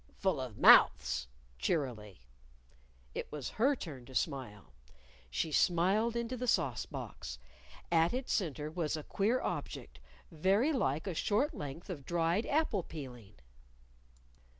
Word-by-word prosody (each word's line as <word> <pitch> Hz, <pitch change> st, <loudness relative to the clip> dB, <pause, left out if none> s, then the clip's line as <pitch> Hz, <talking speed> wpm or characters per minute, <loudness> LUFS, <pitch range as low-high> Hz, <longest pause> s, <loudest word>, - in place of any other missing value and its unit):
"Full 190 Hz, -7 st, +1 dB
of 125 Hz, -5 st, -6 dB
mouths," -, -, +6 dB, 0.3 s
cheerily. 110 Hz, -, -2 dB, 0.9 s
It -, -, -5 dB
was 145 Hz, -5 st, -4 dB
her 280 Hz, +4 st, +5 dB
turn 145 Hz, -, -8 dB
to 130 Hz, -, -12 dB
smile. 125 Hz, -, -3 dB, 0.6 s
She 110 Hz, -, -1 dB
smiled 190 Hz, +9 st, +3 dB
into 235 Hz, +1 st, -2 dB
the 250 Hz, 0 st, -4 dB
sauce -, -, +1 dB
box. -, -, -7 dB, 0.5 s
At 165 Hz, 0 st, +4 dB
its 255 Hz, +1 st, -2 dB
center 155 Hz, -, -1 dB
was 160 Hz, -2 st, -1 dB
a 155 Hz, -, -6 dB
queer 220 Hz, -, +1 dB
object, -, -, -5 dB, 0.3 s
very 195 Hz, -, +2 dB
like 155 Hz, -, 0 dB
a 190 Hz, -, -2 dB
short 220 Hz, -, +1 dB
length 145 Hz, -, -7 dB
of 165 Hz, -7 st, -6 dB
dried 170 Hz, -, 0 dB
apple 290 Hz, -10 st, +1 dB
peeling. 125 Hz, -, -9 dB
165 Hz, 130 wpm, -33 LUFS, 135-215 Hz, 0.9 s, mouths